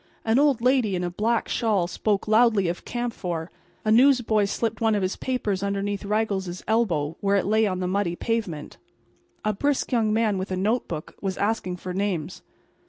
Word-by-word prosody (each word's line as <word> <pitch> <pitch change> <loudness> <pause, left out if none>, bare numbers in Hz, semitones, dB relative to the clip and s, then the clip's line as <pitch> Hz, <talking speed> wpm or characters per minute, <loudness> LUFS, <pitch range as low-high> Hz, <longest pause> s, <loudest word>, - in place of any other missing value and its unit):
An 225 +3 +3
old 280 -5 +3
lady 250 -5 +2
in 180 - -2
a 175 - -2
black 225 +5 0
shawl 210 -6 +1
spoke 200 +4 -1
loudly 215 -3 +4
of 170 +1 -4
camphor; 185 -9 -4 0.3
a 215 - +2
newsboy 235 -4 +4
slipped 225 +2 -2
one 225 -1 +3
of 200 - 0
his 185 - -1
papers 215 -7 -2
beneath 200 0 -2
Raggles's 200 -4 -1
elbow, 170 -9 +1
where 200 0 +2
it 195 - +1
lay 220 +1 +3
on 185 -1 -2
the 180 - -1
muddy 185 -2 0
pavement. 200 -9 -3 0.7
A 215 - +2
brisk 285 +7 0
young 225 -4 +2
man 215 -3 +1
with 190 - -4
a 185 - -2
notebook 190 -6 -2
was 190 -2 -2
asking 200 -4 -1
for 180 +1 -6
names. 190 -5 -2
205 Hz, 180 wpm, -25 LUFS, 185-225 Hz, 0.7 s, loudly